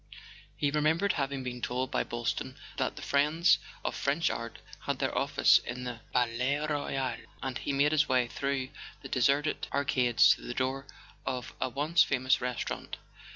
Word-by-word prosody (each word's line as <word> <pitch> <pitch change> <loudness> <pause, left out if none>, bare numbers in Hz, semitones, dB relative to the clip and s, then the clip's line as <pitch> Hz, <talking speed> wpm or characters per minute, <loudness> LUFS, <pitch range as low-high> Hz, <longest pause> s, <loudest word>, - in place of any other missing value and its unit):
He 145 - +1
remembered 160 +6 +2
having 140 -2 -2
been 125 -1 -5
told 125 +2 -2
by - - +1
Boylston 120 -1 -3 0.2
that - - -1
"The - - -8
Friends 155 +3 +3 0.3
of - - 0
French 145 +4 +1
Art" 115 0 -5 0.3
had - - 0
their - - -1
office - - +4
in 125 +1 -6
the 125 -2 -5
Palais 125 +5 +1
Royal, 135 -4 -1 0.3
and 135 -1 -3
he - - -2
made 140 +2 +3
his 155 -2 +3
way 125 -2 +3
through 135 +1 -2 0.3
the 135 - -7
de¬ 130 - -1
serted 145 +4 +1
arcades 130 -4 +4
to - - -11
the 120 - -6
door 135 +1 -1 0.4
of 125 -2 -4
a 130 - +1
once 150 +6 +2
famous 130 0 +2
restaurant. 125 -1 -4
135 Hz, 170 wpm, -30 LUFS, 125-145 Hz, 0.4 s, office